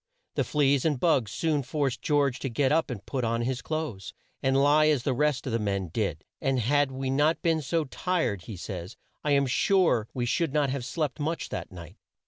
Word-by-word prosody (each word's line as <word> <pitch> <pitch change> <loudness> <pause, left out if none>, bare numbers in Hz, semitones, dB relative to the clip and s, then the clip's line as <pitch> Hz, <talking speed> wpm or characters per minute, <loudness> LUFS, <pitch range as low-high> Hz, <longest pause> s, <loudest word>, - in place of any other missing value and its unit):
The - - +1
fleas 140 -3 +2
and 150 -5 +1
bugs 130 - +2
soon 155 -3 0
forced 135 -1 -2
George 145 -4 +1
to 135 - -3
get 130 +3 +1
up 160 0 +2
and 115 -6 -6
put 130 -3 -3
on 115 0 0
his 125 +1 -2
clothes 155 - -4 0.3
and 135 0 +2
lie 145 +2 +5
as 145 -5 +2
the 135 - +1
rest 145 0 +1
of 130 - -3
the 115 - +1
men 100 -4 -1
did, - - -2 0.2
and 135 -1 +1
"had 140 +4 +2
we 130 0 -3
not 150 +4 +2
been 165 -2 +2
so 160 +4 0
tired," 150 - -1
he 105 - -7
says 90 +4 -7 0.3
"I 150 - +2
am 140 0 +4
sure 140 - +2
we 125 -2 -2
should 150 +4 0
not 145 -3 +2
have 130 -3 -3
slept 150 +2 -2
much 160 +3 -2
that - - -5
night." 85 0 -11
135 Hz, 215 wpm, -27 LUFS, 120-150 Hz, 0.3 s, lie